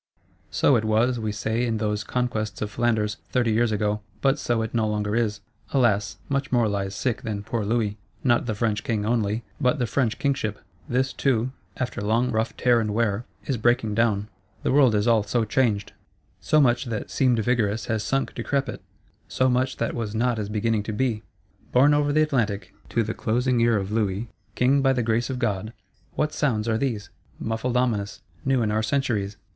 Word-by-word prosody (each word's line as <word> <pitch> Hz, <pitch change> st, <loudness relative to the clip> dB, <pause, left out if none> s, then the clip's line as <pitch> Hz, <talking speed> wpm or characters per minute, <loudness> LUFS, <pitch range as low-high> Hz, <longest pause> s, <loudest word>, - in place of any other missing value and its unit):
So 140 Hz, -, +3 dB
it 110 Hz, -, -1 dB
was, 115 Hz, +3 st, +2 dB
we 110 Hz, -1 st, -2 dB
say, 110 Hz, +3 st, -1 dB
in 115 Hz, -2 st, 0 dB
those 105 Hz, -1 st, -1 dB
conquests 110 Hz, -5 st, -2 dB
of 105 Hz, -, -4 dB
Flanders, 110 Hz, -2 st, 0 dB
thirty 120 Hz, -3 st, +1 dB
years 115 Hz, +1 st, +2 dB
ago: 105 Hz, 0 st, 0 dB, 0.2 s
but 135 Hz, +3 st, +2 dB
so 120 Hz, -2 st, 0 dB
it 110 Hz, -, -5 dB
no 110 Hz, -2 st, +1 dB
longer 105 Hz, 0 st, -1 dB
is. 105 Hz, -3 st, 0 dB, 0.3 s
Alas, 110 Hz, -7 st, +2 dB
much 140 Hz, -1 st, -1 dB
more 120 Hz, -3 st, +3 dB
lies 100 Hz, -1 st, -2 dB
sick 120 Hz, +3 st, -1 dB
than 105 Hz, -5 st, -4 dB
poor 110 Hz, +1 st, -2 dB
Louis: 105 Hz, -1 st, 0 dB, 0.2 s
not 120 Hz, -1 st, +2 dB
the 110 Hz, -, -1 dB
French 110 Hz, 0 st, 0 dB
King 110 Hz, -5 st, -1 dB
only, 110 Hz, -1 st, 0 dB, 0.2 s
but 135 Hz, +1 st, +2 dB
the 125 Hz, -, 0 dB
French 120 Hz, -1 st, 0 dB
Kingship; 120 Hz, -7 st, -1 dB, 0.3 s
this 130 Hz, +2 st, +1 dB
too, 130 Hz, -2 st, +1 dB, 0.3 s
after 125 Hz, -5 st, -3 dB
long 115 Hz, +4 st, +1 dB
rough 110 Hz, 0 st, -1 dB
tear 120 Hz, -2 st, +4 dB
and 105 Hz, -2 st, -1 dB
wear, 115 Hz, 0 st, 0 dB, 0.2 s
is 135 Hz, -, -1 dB
breaking 115 Hz, -1 st, +2 dB
down. 105 Hz, -2 st, +1 dB, 0.4 s
The -, -, +1 dB
world 130 Hz, -5 st, +5 dB
is 105 Hz, +2 st, +1 dB
all 115 Hz, -2 st, +5 dB
so 110 Hz, +3 st, 0 dB
changed; 110 Hz, -3 st, 0 dB, 0.5 s
so 155 Hz, -, +3 dB
much 120 Hz, -2 st, +3 dB
that 115 Hz, -3 st, -4 dB
seemed 125 Hz, -3 st, +3 dB
vigorous 110 Hz, -2 st, +1 dB
has 110 Hz, -2 st, -1 dB
sunk 135 Hz, +5 st, -1 dB
decrepit, 140 Hz, -2 st, -2 dB, 0.5 s
so 130 Hz, 0 st, +1 dB
much 130 Hz, +1 st, +1 dB
that 115 Hz, -, -1 dB
was 115 Hz, -3 st, -3 dB
not 120 Hz, 0 st, +1 dB
is 105 Hz, -1 st, -3 dB
beginning 110 Hz, 0 st, 0 dB
to 110 Hz, +1 st, -5 dB
be!—Borne 115 Hz, +3 st, 0 dB
over 145 Hz, 0 st, +2 dB
the 155 Hz, +1 st, +4 dB
Atlantic, 115 Hz, -9 st, -1 dB, 0.2 s
to 115 Hz, -, +1 dB
the 110 Hz, +1 st, -3 dB
closing 125 Hz, +2 st, +1 dB
ear 115 Hz, -1 st, +4 dB
of 100 Hz, 0 st, -3 dB
Louis, 105 Hz, 0 st, -1 dB, 0.3 s
King 135 Hz, +3 st, +3 dB
by 135 Hz, -1 st, +4 dB
the 125 Hz, -2 st, 0 dB
Grace 115 Hz, +2 st, 0 dB
of 130 Hz, -, -2 dB
God, 110 Hz, -3 st, -2 dB, 0.4 s
what 150 Hz, 0 st, 0 dB
sounds 115 Hz, -7 st, 0 dB
are 110 Hz, -1 st, +1 dB
these; 110 Hz, -7 st, -2 dB, 0.3 s
muffled 115 Hz, +3 st, -1 dB
ominous, 105 Hz, -5 st, -1 dB, 0.2 s
new 130 Hz, -2 st, +2 dB
in 105 Hz, -, 0 dB
our 110 Hz, +1 st, +1 dB
centuries? 105 Hz, -4 st, -1 dB
115 Hz, 195 wpm, -25 LUFS, 105-125 Hz, 0.5 s, world